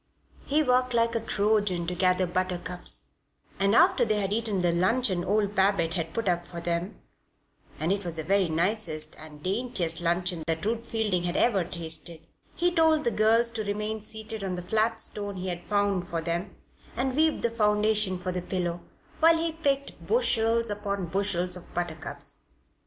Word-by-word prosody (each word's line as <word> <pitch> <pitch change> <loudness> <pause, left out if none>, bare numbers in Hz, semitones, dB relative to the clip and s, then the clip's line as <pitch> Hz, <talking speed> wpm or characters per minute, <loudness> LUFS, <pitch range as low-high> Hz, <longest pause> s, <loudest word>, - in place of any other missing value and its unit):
He 300 +2 +2
worked 250 -2 +2
like 230 0 +2
a 230 - 0
Trojan 205 -5 +1
to 180 - -2
gather 185 +1 +2
buttercups, 180 0 0 0.4
and 200 +3 +3
after - - +5
they 215 -1 +1
had 200 0 -1
eaten 220 -2 0
the 175 -2 +2
luncheon 185 +1 +1
old 205 +2 0
Babette 190 -4 +2
had 165 -3 -2
put 230 +2 -3
up 175 -1 0
for 170 - -7
them 170 +4 -2 0.8
(and 160 +4 +1
it 200 0 0
was 170 -2 -3
the 160 - -2
very 195 +1 +2
nicest 170 -1 -1
and 150 -1 -11
daintiest 185 -5 0
luncheon 175 0 0
that 165 +2 -1
Ruth 230 +1 -2
Fielding 210 -7 0
had 175 - -1
ever 205 -6 +3
tasted) 165 -1 -1 0.4
he 350 +1 +1
told 320 -2 +3
the 235 - +1
girls 230 +2 +4
to 225 -2 -3
remain 210 +1 -3
seated 220 0 -5
on 185 -2 -2
the 180 - -6
flat 220 +3 0
stone 205 -2 -4
he 185 0 -4
had 175 -1 -4
found 200 -3 0
for 170 - -1
them 170 +4 -3 0.4
and 255 +2 -1
weave 315 +1 +2
the 235 - +1
foundation 210 -3 +2
for 180 +1 -4
the 180 0 -3
pillow 175 -1 -3 0.4
while 330 +1 +6
he 330 0 -1
picked 280 -4 -2
bushels 230 - +2
upon 200 -2 -3
bushels 180 -1 -1
of 180 - -12
buttercups. 170 -2 -3
200 Hz, 180 wpm, -27 LUFS, 175-225 Hz, 0.8 s, while